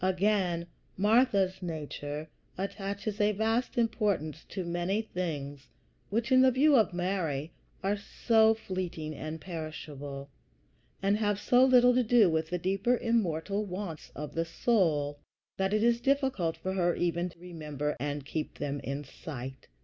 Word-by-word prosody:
Again, 185 -2 +1 0.3
Martha's 205 -3 +3
nature 150 -2 -5 0.3
attaches 200 +2 -3
a 210 +1 +3
vast 225 +5 0
importance 205 -10 0
to 190 -3 -4
many 175 +5 -1
things 145 - -4 0.4
which, 230 +5 -1
in 255 0 +7
the 260 - +7
view 280 +4 +4
of 220 -5 +4
Mary, 175 -5 -2 0.3
are 200 +2 +2
so 220 +2 +3
fleeting 185 -7 -4
and 155 +2 -6
perishable, 145 -4 -7 0.7
and 200 +1 +3
have 205 -2 0
so 245 +3 +4
little 250 -1 +6
to 255 - +4
do 225 -5 +5
with 160 0 0
the 180 - -1
deeper 195 +7 +1
immortal 205 -4 0
wants 185 -5 -6
of 150 0 -6
the 165 - 0
soul, 165 -7 +1 0.4
that 190 0 +1
it 215 +1 +2
is 235 0 +3
difficult 265 - +1
for 190 - -3
her 175 -2 +2
even 175 +1 0
to 170 - -18
remember 150 -4 -4
and 145 0 -3
keep 155 +2 -4
them 145 0 -3
in 140 +2 -4
sight. 135 -3 -8
185 Hz, 150 wpm, -30 LUFS, 155-215 Hz, 0.7 s, in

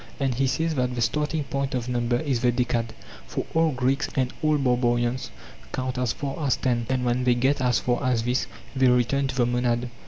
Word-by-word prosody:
And 135 -2 +1
he 135 +3 +1
says 160 +4 0
that 125 -3 -1
the 120 - -2
starting 150 +7 0
point 140 0 -2
of 125 -1 -2
number 120 -1 0
is 135 -6 -1
the 125 -1 +3
decad; 120 -1 0 0.4
for - - -3
all 165 0 +3
Greeks 130 +2 0
and 130 -2 0
all 155 -1 +3
barbarians 125 -1 +1 0.4
count 130 -1 -2
as 125 -3 +1
far 140 +2 -4
as 135 - +2
ten, 120 -3 0
and 130 -1 0
when 125 +1 +1
they 125 -1 +3
get 130 +3 +1
as 125 -2 +3
far 125 +2 0
as 125 -3 +1
this 125 +2 0 0.3
they 130 -1 +4
return 125 +3 +2
to 130 - -4
the 125 -2 +3
monad. 120 0 0
125 Hz, 215 wpm, -25 LUFS, 120-135 Hz, 0.4 s, they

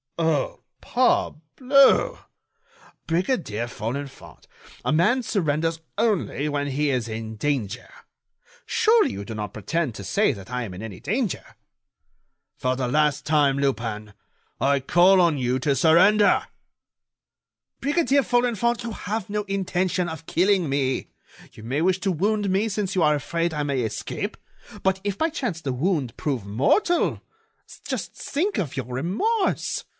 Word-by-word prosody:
"Oh! 160 -4 0 0.2
parbleu! 265 - +3 0.9
Brigadier 165 - -1
Folenfant, 125 +5 -7 0.4
a - - +1
man 210 +12 +3
surrenders 165 -5 0 0.2
only 205 -9 0
when 145 -1 -1
he 145 +1 0
is 125 -3 -1
in 110 0 -6
danger. 130 -6 -2 0.8
Surely, 460 -1 +3
you 100 - -6
do 110 - -6
not 105 -2 -5
pretend 135 +3 -2
to 100 - -7
say 200 - +2
that 100 -2 -9
I 125 0 -2
am 95 -5 -7
in 95 - -8
any 105 -5 -7
danger." 215 - -2 1.1
"For 130 0 0
the 130 -1 -2
last 150 +3 +1
time, 145 -3 +3
Lupin, 115 -6 -2 0.5
I 140 +1 +2
call 175 +8 +5
on 165 -5 +2
you 125 0 0
to 140 +1 +1
surrender." 190 - +4 1.3
"Brigadier 285 -1 +2
Folenfant, 240 -2 +1
you 235 - -4
have 215 -1 -4
no 210 0 -2
intention 185 -2 -1
of 160 -1 -7
killing 185 -2 +2
me; 135 -2 -1 0.4
you 110 - -13
may 130 +7 -1
wish 185 +1 +2
to 195 - +1
wound 205 +4 0
me 200 +4 +1
since 200 -2 -2
you 185 - +1
are 150 -1 +4
afraid 170 +3 -2
I 150 - -1
may 140 -3 -1
escape. 110 -2 -4 0.5
But 190 0 +2
if 200 -1 -2
by 320 - +1
chance 240 - -3
the 135 -4 -2
wound 140 -3 -1
prove 130 -9 -3
mortal? 140 - +1 0.7
Just - - -4
think 365 +9 -2
of 155 -5 -3
your 130 - -2
remorse! 190 - -1
160 Hz, 145 wpm, -24 LUFS, 130-205 Hz, 1.3 s, call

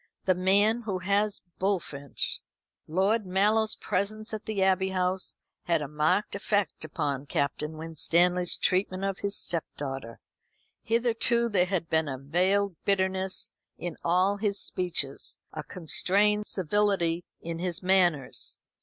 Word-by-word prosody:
"The 185 - +4
man 200 +5 +3
who 205 -5 -3
has 200 +3 +1 0.2
Bullfinch!" 165 -8 -1 0.5
Lord 195 +5 +1
Mallow's 210 +4 +2
presence 215 +3 -2
at 215 - -5
the 205 -3 -1
Abbey 190 0 +2
House 185 0 -1 0.3
had 170 -2 +2
a - - -4
marked 150 +8 0
effect 205 -2 -1
upon 145 -2 -3
Captain 150 +3 -2
Winstanley's 170 +3 +2
treatment 185 0 +1
of 195 -1 -2
his 200 0 -1
stepdaughter. 135 -7 -2 0.6
Hitherto 235 +1 +2
there 185 -4 +2
had 180 -3 -1
been 160 -1 +1
a 135 - -4
veiled 180 +7 +1
bitterness 190 -1 +1 0.3
in 175 -3 -5
all 185 +4 +2
his 205 -1 -1
speeches, 170 -7 -1 0.2
a - - -4
constrained 205 +5 +2
civility 185 -2 +1 0.2
in 165 0 -5
his 180 0 -2
manners. 180 -7 +1
185 Hz, 130 wpm, -28 LUFS, 165-200 Hz, 0.6 s, The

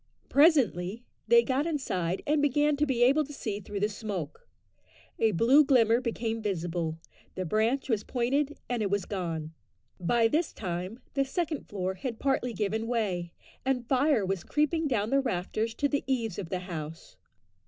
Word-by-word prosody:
Presently 245 - +3 0.2
they 470 0 +6
got 275 +4 0
inside 185 - -2
and 295 0 +2
began 290 +1 +3
to 300 +1 +1
be 245 -3 +2
able 275 +5 +5
to 290 - -10
see 215 -7 -4
through 205 0 -6
the 210 - +3
smoke; 205 - -6 0.7
a 225 - +4
blue 235 - +5
glimmer 240 -4 +4
became 230 -2 -2
visible, 170 -5 -2 0.4
the 185 - -3
branch 220 - +1
was 220 -5 0
pointed, 275 +4 0
and 245 -2 -1
it 205 - 0
was 200 -2 0
gone. 165 -5 -4 0.5
By 225 +6 +3
this 310 +8 0
time 185 +6 -5
the 275 - +2
second 310 +1 -3
floor 190 -2 -2
had 235 +3 -5
partly 265 -2 0
given 220 +2 -1
way, 195 -8 -1 0.3
and 255 -3 -1
fire 260 -4 +3
was 190 -2 -2
creeping 305 +2 +1
down 220 -5 0
the 275 0 +4
rafters 220 0 -2
to 285 - +1
the 285 0 -1
eaves 230 -8 -1
of 180 -5 -5
the 185 -1 -2
house. 165 -3 -7
230 Hz, 170 wpm, -29 LUFS, 190-275 Hz, 0.7 s, they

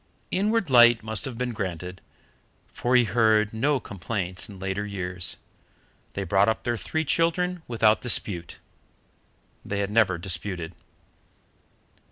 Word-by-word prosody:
Inward 210 -3 +1
light 120 -2 +7
must 110 +3 -2
have 130 -4 -6
been 125 0 -2
granted, 90 -3 -5 0.7
for 125 +1 0
he 125 - +6
heard 110 0 +2
no 135 +5 +1
complaints 95 -1 -4
in 100 - -10
later 95 +2 -3
years. 95 -3 -3 0.8
They 100 - -3
brought 95 +3 +3
up 110 - -2
their 120 - 0
three 160 +7 -2
children 175 +3 +1
without 110 -2 +3
dispute. 95 -8 0 1.1
They 100 - -4
had 100 0 -1
never 105 -5 +3
disputed. 90 -1 -3
110 Hz, 130 wpm, -26 LUFS, 95-125 Hz, 1.1 s, light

